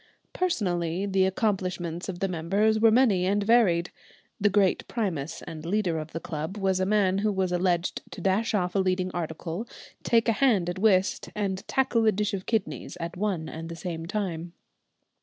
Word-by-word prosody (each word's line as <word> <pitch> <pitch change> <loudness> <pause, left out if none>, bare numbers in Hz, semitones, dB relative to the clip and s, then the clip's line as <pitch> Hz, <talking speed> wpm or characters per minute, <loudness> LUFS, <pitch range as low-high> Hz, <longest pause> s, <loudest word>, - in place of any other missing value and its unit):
Personally 185 - 0
the 190 -1 +2
accomplishments 185 -4 -2
of 175 -2 -6
the 195 - +2
members 195 +6 +1
were 225 +1 +6
many 215 -6 +4
and 205 +1 +1
varied. 200 -6 +3 0.5
The 205 - +3
great 200 -2 +2
primus 165 - -3
and 155 -1 -8
leader 175 -2 0
of 155 +1 -7
the 165 - -4
club 160 +3 -5
was 190 -2 +1
a 185 - +1
man 195 -2 +2
who 210 +1 +1
was 190 -2 0
alleged 175 -1 0
to - - -9
dash 205 +4 +1
off 180 -3 0
a 195 - +1
leading 185 -1 0
article, 170 +4 -4 0.3
take 230 0 +2
a - - +5
hand 210 -7 +2
at 175 - -7
whist, 190 -3 +2
and 195 -3 -2
tackle 250 -3 +2
a - - +6
dish 210 0 -1
of 190 -1 -4
kidneys 220 -5 -2
at 170 0 -5
one 185 -5 -2
and 165 +1 -7
the 170 - -6
same 165 -1 -5
time. 175 -4 -3
190 Hz, 185 wpm, -27 LUFS, 175-210 Hz, 0.5 s, were